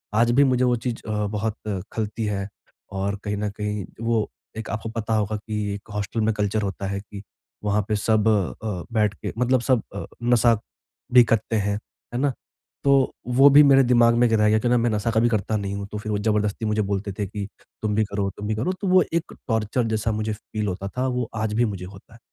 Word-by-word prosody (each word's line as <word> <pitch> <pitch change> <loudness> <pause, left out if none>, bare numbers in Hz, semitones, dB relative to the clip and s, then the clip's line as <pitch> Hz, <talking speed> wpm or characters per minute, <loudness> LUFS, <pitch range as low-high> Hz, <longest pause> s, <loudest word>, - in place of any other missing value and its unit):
आज 115 +2 +4
भी 135 +4 +5
मुझे 130 -2 +2
वो 125 -1 +3
चीज़ 120 0 -4
अ, 105 -1 -1
बहुत 105 +1 -2 0.4
खलती 110 0 -2
है 100 -2 -2 0.5
और 100 +1 -1
कहीं 105 0 -1
न 105 0 -1
कहीं 105 -2 -3 0.2
वो 115 -2 +1 0.3
एक 110 - -5
आपको 110 0 -3
पता 115 -1 -3
होगा 105 0 0
कि 105 -1 -3
हॉस्टल 105 +2 -2
में 110 +1 +2
कल्चर 105 +1 0
होता 100 0 -3
है 100 0 -2
कि 100 -1 -10 0.4
वहाँ 105 +1 +2
पे 105 - +2
सब 110 +1 +2
अ, 105 -1 -1
बैठ 105 -2 +2
के - - -6
मतलब 125 0 +3
सब 125 -2 +2
अ, 100 - -4 0.2
नशा 120 -2 +4 0.5
भी 125 -1 +9
करते 115 -1 0
हैं, 100 -1 0 0.4
है - - -1
ना? 140 0 +1 0.5
तो 140 -2 +4
वो 130 +3 +6
भी 145 +1 +8
मेरे 135 -1 +6
दिमाग 120 -1 +5
में 120 +1 +4
एक 115 - 0
रह 105 -1 +4
गया 110 - +4
कि 120 - -1
ना 125 - +4
मैं 120 0 +2
नशा 110 +1 0
कभी 115 +2 +3
करता 110 -1 0
नहीं 100 -1 -3
हूँ, 100 0 -5
तो 105 - -4
फिर 105 +1 -4
वो 105 - +1
ज़बरदस्ती 105 +1 0
मुझे 105 0 +1
बोलते 100 +1 -1
थे 105 - 0
कि 100 +1 -5 0.3
तुम 105 -1 0
भी 110 - +3
करो, 100 -1 -2
तुम 105 - -5
भी 110 - 0
करो, 120 +13 -1
तो 190 +1 -5
वो 185 0 +6
एक 170 0 -1
टॉर्चर 110 +1 0
जैसा 110 +1 0
मुझे 110 0 -2
फील 105 0 -5
होता 95 +1 -3
था 130 +1 +1
वो 125 -2 -2
आज 110 -1 -1
भी 120 +3 +3
मुझे 100 -4 -4
होता 95 +3 -13
है। 115 - -16
110 Hz, 230 wpm, -24 LUFS, 105-120 Hz, 0.5 s, भी